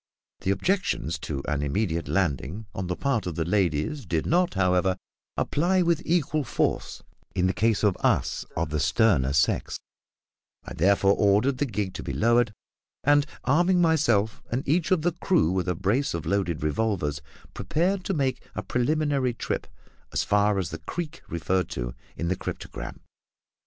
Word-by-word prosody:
The -, -, -3 dB
objections 100 Hz, -, 0 dB
to 70 Hz, -3 st, -4 dB
an 75 Hz, -2 st, 0 dB
immediate 85 Hz, +3 st, -1 dB
landing 90 Hz, -, -1 dB
on 95 Hz, -1 st, -4 dB
the 90 Hz, -, -1 dB
part 125 Hz, -6 st, -1 dB
of 85 Hz, -, -4 dB
the 80 Hz, -, -1 dB
ladies 90 Hz, -, 0 dB
did 80 Hz, -2 st, 0 dB
not, 175 Hz, -2 st, +2 dB
however, 90 Hz, 0 st, +2 dB, 0.4 s
apply 180 Hz, +4 st, +2 dB
with 170 Hz, -1 st, +2 dB
equal 155 Hz, -3 st, +1 dB
force -, -, -1 dB, 0.3 s
in 90 Hz, -1 st, +2 dB
the 95 Hz, -, +2 dB
case 110 Hz, -1 st, +1 dB
of 100 Hz, -4 st, +3 dB
us -, -, +1 dB
of 75 Hz, -, -1 dB
the 75 Hz, -, 0 dB
sterner 70 Hz, -1 st, +3 dB
sex; 70 Hz, +1 st, +1 dB, 0.9 s
I -, -, -7 dB
therefore 100 Hz, +3 st, +4 dB
ordered 105 Hz, +6 st, +3 dB
the 145 Hz, -, +1 dB
gig 100 Hz, -4 st, -3 dB
to -, -, -6 dB
be -, -, -4 dB
lowered, 120 Hz, 0 st, +3 dB, 0.5 s
and, 145 Hz, +1 st, +4 dB, 0.2 s
arming 175 Hz, +6 st, +3 dB
myself 120 Hz, -11 st, +2 dB
and 125 Hz, +4 st, -2 dB
each 165 Hz, +4 st, +2 dB
of 185 Hz, -5 st, +2 dB
the 175 Hz, -, +2 dB
crew 170 Hz, -, +2 dB
with 95 Hz, 0 st, -1 dB
a 90 Hz, -, 0 dB
brace 100 Hz, -, 0 dB
of 85 Hz, -, -4 dB
loaded 90 Hz, -6 st, -1 dB
revolvers, 75 Hz, -3 st, 0 dB, 0.3 s
prepared 185 Hz, +4 st, 0 dB
to 195 Hz, -, -1 dB
make 135 Hz, -3 st, 0 dB
a -, -, -3 dB
preliminary 140 Hz, -1 st, 0 dB
trip -, -, -3 dB, 0.4 s
as -, -, 0 dB
far 105 Hz, 0 st, +2 dB
as 90 Hz, -4 st, -2 dB
the 80 Hz, -, -5 dB
creek 165 Hz, -, -5 dB
referred 90 Hz, +3 st, 0 dB
to -, -, -4 dB, 0.2 s
in 85 Hz, -, -2 dB
the 95 Hz, -, +1 dB
cryptogram. -, -, -7 dB
105 Hz, 165 wpm, -26 LUFS, -, 0.9 s, therefore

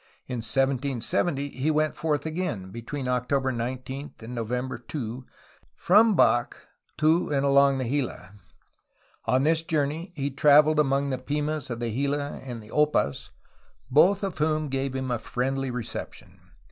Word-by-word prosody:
In 125 Hz, -, -4 dB
1770 135 Hz, +4 st, 0 dB
he 140 Hz, +3 st, -2 dB
went 155 Hz, 0 st, +1 dB
forth 150 Hz, -3 st, -1 dB
again, 155 Hz, -, -3 dB
between 125 Hz, +4 st, -5 dB
October 130 Hz, +2 st, 0 dB
19 130 Hz, +4 st, -5 dB
and 115 Hz, +2 st, -8 dB
November 125 Hz, +2 st, -3 dB
2, 125 Hz, -2 st, -6 dB, 0.5 s
from 215 Hz, +3 st, +5 dB
Bac 120 Hz, -7 st, +3 dB, 0.4 s
to 160 Hz, +3 st, +3 dB
and 140 Hz, -1 st, +1 dB
along 140 Hz, 0 st, +5 dB
the 130 Hz, -2 st, -2 dB
Gila. 125 Hz, -8 st, -3 dB, 0.9 s
On 130 Hz, +1 st, +2 dB
this 160 Hz, +2 st, +3 dB
journey 160 Hz, +2 st, -2 dB
he 140 Hz, -2 st, -2 dB
traveled 150 Hz, +2 st, +5 dB
among 140 Hz, -1 st, +2 dB
the 130 Hz, -, -2 dB
Pimas 150 Hz, +1 st, -2 dB
of 120 Hz, -1 st, -4 dB
the 120 Hz, -1 st, -2 dB
Gila 140 Hz, +3 st, -2 dB
and 120 Hz, -4 st, -7 dB
the 105 Hz, -, -14 dB
Opas, 150 Hz, -, +1 dB, 0.6 s
both 190 Hz, +9 st, +5 dB
of 190 Hz, -5 st, -3 dB
whom 155 Hz, -1 st, +1 dB
gave 135 Hz, 0 st, -2 dB
him 130 Hz, -1 st, -2 dB
a 120 Hz, -, 0 dB
friendly 135 Hz, +3 st, -2 dB
reception. 120 Hz, -2 st, -7 dB
140 Hz, 145 wpm, -26 LUFS, 125-150 Hz, 0.9 s, from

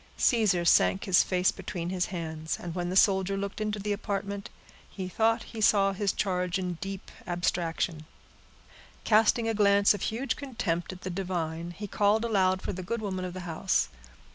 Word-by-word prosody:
Caesar 205 Hz, -8 st, +3 dB
sank 190 Hz, +2 st, +4 dB
his 185 Hz, -2 st, +5 dB
face 185 Hz, 0 st, +2 dB
between 175 Hz, -2 st, -5 dB
his 180 Hz, -1 st, 0 dB
hands; 160 Hz, -3 st, -4 dB
and 170 Hz, -2 st, -6 dB
when 175 Hz, 0 st, -2 dB
the 185 Hz, -, -3 dB
soldier 195 Hz, -1 st, +3 dB
looked 200 Hz, +2 st, -4 dB
into 210 Hz, -1 st, -1 dB
the 205 Hz, +1 st, -3 dB
apartment, 200 Hz, -1 st, -4 dB, 0.4 s
he 190 Hz, -2 st, -5 dB
thought 225 Hz, +4 st, +1 dB
he 225 Hz, -, -5 dB
saw 195 Hz, -2 st, +4 dB
his 195 Hz, 0 st, 0 dB
charge 180 Hz, -2 st, -1 dB
in 180 Hz, -3 st, -4 dB
deep 195 Hz, 0 st, -6 dB, 0.2 s
abstraction. 170 Hz, -2 st, -1 dB, 1.0 s
Casting 225 Hz, +1 st, +4 dB
a 225 Hz, -, +1 dB
glance 200 Hz, -1 st, +5 dB
of 205 Hz, -, -6 dB
huge 245 Hz, +5 st, -1 dB
contempt 215 Hz, -, -3 dB
at 185 Hz, 0 st, -10 dB
the 185 Hz, -, -4 dB
divine, 170 Hz, -3 st, -3 dB
he 190 Hz, +4 st, -7 dB
called 205 Hz, +3 st, +2 dB
aloud 190 Hz, -4 st, +2 dB
for -, -, -3 dB
the 185 Hz, -, -5 dB
good 230 Hz, +6 st, -3 dB
woman 190 Hz, -3 st, -3 dB
of 180 Hz, 0 st, -5 dB
the 185 Hz, -, -5 dB
house. 175 Hz, +2 st, 0 dB
190 Hz, 180 wpm, -28 LUFS, 180-205 Hz, 1.0 s, his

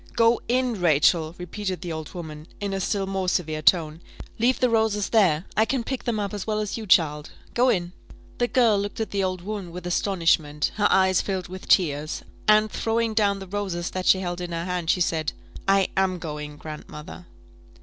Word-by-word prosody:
"Go 230 Hz, 0 st, +4 dB
in, 245 Hz, -4 st, 0 dB
Rachel," 160 Hz, 0 st, +3 dB
repeated 185 Hz, +1 st, -4 dB
the 175 Hz, -, -5 dB
old 160 Hz, +1 st, -6 dB
woman, 155 Hz, -2 st, -8 dB
in 200 Hz, -1 st, -3 dB
a 195 Hz, -, -1 dB
still 195 Hz, +1 st, -1 dB
more 190 Hz, -1 st, -1 dB
severe 155 Hz, -4 st, -1 dB
tone; 160 Hz, -1 st, +3 dB, 0.4 s
"leave 245 Hz, +3 st, +2 dB
the 250 Hz, -, +4 dB
roses 220 Hz, -3 st, +1 dB
there 185 Hz, -7 st, +3 dB
I 220 Hz, -, +4 dB
can 255 Hz, 0 st, -1 dB
pick 265 Hz, +1 st, -4 dB
them 230 Hz, -3 st, 0 dB
up 205 Hz, 0 st, -3 dB
as 205 Hz, 0 st, -5 dB
well 215 Hz, -1 st, 0 dB
as 210 Hz, -1 st, -2 dB
you, 220 Hz, -2 st, -6 dB
child 150 Hz, -5 st, +3 dB, 0.2 s
go 250 Hz, +2 st, +3 dB
in." 175 Hz, -5 st, 0 dB, 0.5 s
The 240 Hz, -, +2 dB
girl 235 Hz, -5 st, +3 dB
looked 205 Hz, +2 st, -4 dB
at 220 Hz, -, -2 dB
the 200 Hz, -1 st, 0 dB
old 185 Hz, -1 st, -2 dB
woman 195 Hz, -2 st, -5 dB
with 180 Hz, +1 st, -8 dB
astonishment, 165 Hz, -5 st, +1 dB
her 205 Hz, -1 st, +4 dB
eyes 190 Hz, -1 st, +4 dB
filled 190 Hz, -3 st, -3 dB
with 185 Hz, +1 st, -9 dB
tears, 155 Hz, -4 st, +2 dB, 0.2 s
and 215 Hz, 0 st, +5 dB
throwing 225 Hz, 0 st, 0 dB
down 205 Hz, -2 st, +2 dB
the 195 Hz, -, -8 dB
roses 185 Hz, -3 st, -3 dB
that 185 Hz, 0 st, -3 dB
she 190 Hz, -, +5 dB
held 175 Hz, -1 st, -3 dB
in 175 Hz, -1 st, -5 dB
her 165 Hz, 0 st, -3 dB
hand, 180 Hz, -3 st, -3 dB
she 180 Hz, -, +2 dB
said, 160 Hz, -3 st, 0 dB, 0.3 s
"I 195 Hz, -1 st, +3 dB
am 190 Hz, -1 st, +1 dB
going, 150 Hz, -3 st, -6 dB
grandmother." 155 Hz, +3 st, -9 dB
185 Hz, 200 wpm, -25 LUFS, 170-210 Hz, 0.5 s, and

